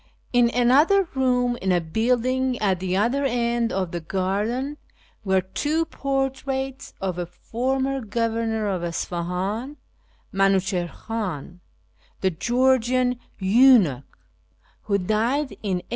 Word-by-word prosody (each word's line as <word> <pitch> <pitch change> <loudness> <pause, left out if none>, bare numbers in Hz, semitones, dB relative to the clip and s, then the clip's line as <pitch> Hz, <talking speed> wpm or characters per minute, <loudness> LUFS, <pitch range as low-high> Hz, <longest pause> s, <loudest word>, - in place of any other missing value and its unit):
In 245 -1 +5
another 290 +11 +4
room 250 -2 +1
in 190 - +1
a 180 - +3
building 250 +8 0
at 195 -5 +1
the 185 0 -1
other 240 +7 +1
end 235 -2 0
of 185 -3 -2
the 175 - -3
garden 205 - -2 0.5
were 190 -2 +2
two 300 - -1
portraits 270 -1 -3
of 185 -2 -3
a 175 - -3
former 265 +8 -2
governor 225 0 -1
of 185 -3 -2
Isfahan, 180 - -3 0.6
Minuchihr 195 -2 +2
Khan, 185 -7 -5 0.6
the 190 - +2
Georgian 250 +4 +2 0.2
eunuch, 195 - +4 0.7
who 200 -2 +2
died 230 +9 0
in 190 -4 -1
a. - - -36
230 Hz, 115 wpm, -24 LUFS, 190-260 Hz, 0.7 s, In